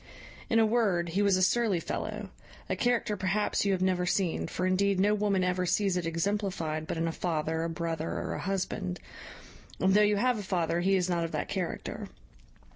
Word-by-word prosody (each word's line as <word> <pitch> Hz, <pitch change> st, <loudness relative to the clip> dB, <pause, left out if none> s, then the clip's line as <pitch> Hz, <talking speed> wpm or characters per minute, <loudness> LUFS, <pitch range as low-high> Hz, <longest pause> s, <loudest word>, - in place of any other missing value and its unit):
In 225 Hz, -, +3 dB
a 225 Hz, -, +6 dB
word, 205 Hz, -7 st, +1 dB
he 190 Hz, +5 st, 0 dB
was 200 Hz, -2 st, +4 dB
a 185 Hz, -, +2 dB
surly 210 Hz, -2 st, +2 dB
fellow, -, -, -4 dB, 0.4 s
a -, -, -1 dB
character 240 Hz, -3 st, +1 dB
perhaps 195 Hz, +2 st, 0 dB
you 200 Hz, -, +2 dB
have 185 Hz, -1 st, 0 dB
never 180 Hz, -1 st, +1 dB
seen; 180 Hz, -2 st, 0 dB
for, 185 Hz, -, -2 dB
indeed, 190 Hz, +1 st, +2 dB
no 205 Hz, +2 st, +4 dB
woman 205 Hz, -3 st, +1 dB
ever 180 Hz, 0 st, 0 dB
sees 190 Hz, +1 st, +2 dB
it 175 Hz, -2 st, -1 dB
exemplified 165 Hz, -3 st, -1 dB
but -, -, -3 dB
in 165 Hz, +1 st, 0 dB
a -, -, 0 dB
father, 160 Hz, -1 st, -1 dB
a 165 Hz, -, -1 dB
brother, 165 Hz, -1 st, -3 dB
or -, -, -3 dB
a -, -, -4 dB
husband; 180 Hz, -, -2 dB, 0.8 s
and, 190 Hz, 0 st, +3 dB
though 210 Hz, -, +6 dB
you 210 Hz, 0 st, +3 dB
have 245 Hz, +1 st, +2 dB
a -, -, -3 dB
father, 175 Hz, -3 st, 0 dB
he 195 Hz, +2 st, +3 dB
is 180 Hz, -1 st, +1 dB
not 175 Hz, -2 st, 0 dB
of 165 Hz, -, -4 dB
that -, -, -2 dB
character. 185 Hz, -3 st, -4 dB
185 Hz, 205 wpm, -29 LUFS, 170-205 Hz, 0.8 s, a